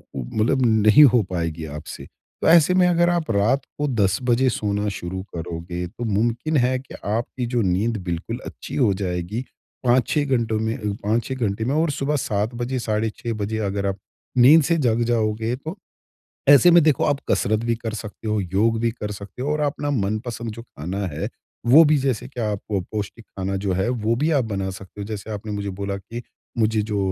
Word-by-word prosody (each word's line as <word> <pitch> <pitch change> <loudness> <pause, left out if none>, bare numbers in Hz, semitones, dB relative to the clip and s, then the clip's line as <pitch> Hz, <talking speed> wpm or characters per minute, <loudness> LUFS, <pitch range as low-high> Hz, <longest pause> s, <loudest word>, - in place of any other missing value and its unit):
मतलब 110 - 0
नहीं 110 +4 +6
हो 120 - +5
पाएगी 85 -2 -3
आपसे। 75 0 -8
तो - - -7
ऐसे 170 +1 +6
में 180 -1 +4
अगर 175 0 +3
आप 170 -7 0
रात 110 +7 +2 0.2
को 145 0 0
10 100 -6 +1
बजे 125 +1 +3
सोना 105 -2 -1
शुरू 95 +2 -5
करोगे 85 +1 -5
तो 115 - -8
मुमकिन 115 +8 0
है 130 0 0
कि 130 - -12
आपकी 115 +4 -2
जो 120 - +3
नींद 105 +4 +1
बिल्कुल 90 +7 -4
अच्छी - - -8
हो 115 -8 +3
जाएगी 90 +6 -2 0.4
5-6 130 +4 +2
घंटों 110 -2 0
में 110 +1 -1 0.3
5-6 115 +5 0
घंटे 110 -3 -1
में। 135 +4 0
और 160 +1 +2
सुबह 140 +1 -1
7 105 +3 -1
बजे 125 +2 -2
साढ़े 110 -1 0
6 120 -1 -3
बजे 105 +2 -2
अगर 100 0 -2
आप 95 - -2 0.4
नींद 145 +6 +7
से 170 +3 +2
जग 115 +1 +2
जाओगे 110 +1 0
तो 160 +8 -7 0.7
ऐसे 145 +5 +8
में 170 0 +7
देखो 150 -4 +3
आप 145 -1 +1
कसरत 110 +1 +2
भी 115 0 +1
कर 115 -1 -5
सकते 110 0 -7
हो, 105 -1 +1
योग 100 +5 +1
भी 115 0 +1
कर 105 -2 -6
सकते 100 +5 -8
हो 145 - -1
और 150 - -1
अपना 145 0 -1
मनपसंद 115 0 -2
जो 115 +2 -9
खाना 95 - -5
है 75 - -4 0.4
वो 140 +7 +8
भी 155 0 +4
जैसे 130 -5 -1
कि 130 -2 -7
आप 105 -3 -1
पौष्टिक 105 +3 -4
खाना 95 -1 -4
जो 95 - +1
है 95 +5 0 0.2
वो 115 +2 +3
भी 150 +6 +1
आप 140 -5 +2
बना 95 -3 -3
सकते 95 +2 -10
हो। - - -3
जैसे 105 0 -6
आपने 105 +1 -5
मुझे 100 -1 -3
बोला 100 0 -2
कि 115 +5 -8 0.4
मुझे 110 -1 +2
जो 105 -1 -2
110 Hz, 200 wpm, -22 LUFS, 100-130 Hz, 0.7 s, ऐसे